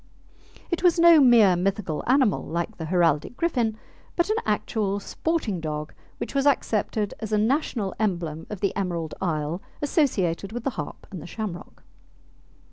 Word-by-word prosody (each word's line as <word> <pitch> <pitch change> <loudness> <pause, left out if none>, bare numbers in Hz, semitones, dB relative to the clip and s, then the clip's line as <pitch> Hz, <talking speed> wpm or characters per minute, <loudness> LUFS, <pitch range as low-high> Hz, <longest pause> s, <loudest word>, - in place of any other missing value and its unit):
It 345 - 0
was 355 -1 +4
no 335 -1 +8
mere 235 -8 +6
mythical 185 -3 -1
animal 255 -5 +3
like 170 +1 -3
the 160 - -5
heraldic 170 +3 +1
griffin, 240 -10 0 0.4
but 345 +4 +1
an 435 - +1
actual 205 -3 0
sporting 235 - -2
dog 150 -1 -4 0.2
which - - -5
was 275 0 +2
accepted 215 -5 0
as 220 -1 -5
a 215 - +3
national 220 - 0
emblem 170 -7 -2
of 210 -3 -6
the 200 - 0
Emerald 170 -5 -2
Isle, 160 -1 -1 0.2
associated 210 - 0
with 240 -1 -4
the 275 - 0
harp 150 -10 -7
and 185 -5 -7
the - - -9
shamrock. 200 -4 -7
205 Hz, 155 wpm, -25 LUFS, 170-255 Hz, 0.4 s, no